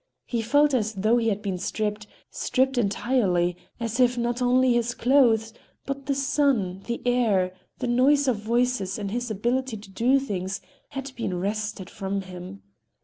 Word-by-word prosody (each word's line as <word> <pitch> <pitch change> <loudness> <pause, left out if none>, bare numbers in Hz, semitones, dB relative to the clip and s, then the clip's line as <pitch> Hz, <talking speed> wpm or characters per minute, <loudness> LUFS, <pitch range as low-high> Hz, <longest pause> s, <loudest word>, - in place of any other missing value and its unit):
He 235 -2 -1
felt 290 +5 +3
as 220 -3 +1
though 215 +5 +3
he 230 -1 +1
had 210 -1 -2
been 190 -3 -2
stripped, 210 +2 -2 0.2
stripped 265 -1 +1
entirely,—as 205 0 0
if 245 -1 +4
not 240 +1 -1
only 250 0 +4
his 240 0 0
clothes, 230 -4 +3 0.3
but 275 -1 -5
the 280 - +1
sun, 270 -9 +1
the 235 0 -3
air, 215 -7 +2 0.2
the 255 - -3
noise 275 +4 +4
of 250 -4 +2
voices 230 -2 0
and 200 -2 -4
his 240 +2 -2
ability 240 +3 -1
to 200 -1 -13
do 245 +7 +3
things 195 -8 -3 0.3
had 275 -1 -6
been 190 -6 -2
wrested 205 0 -3
from 195 0 -3
him. 180 - -9
230 Hz, 160 wpm, -25 LUFS, 200-255 Hz, 0.3 s, if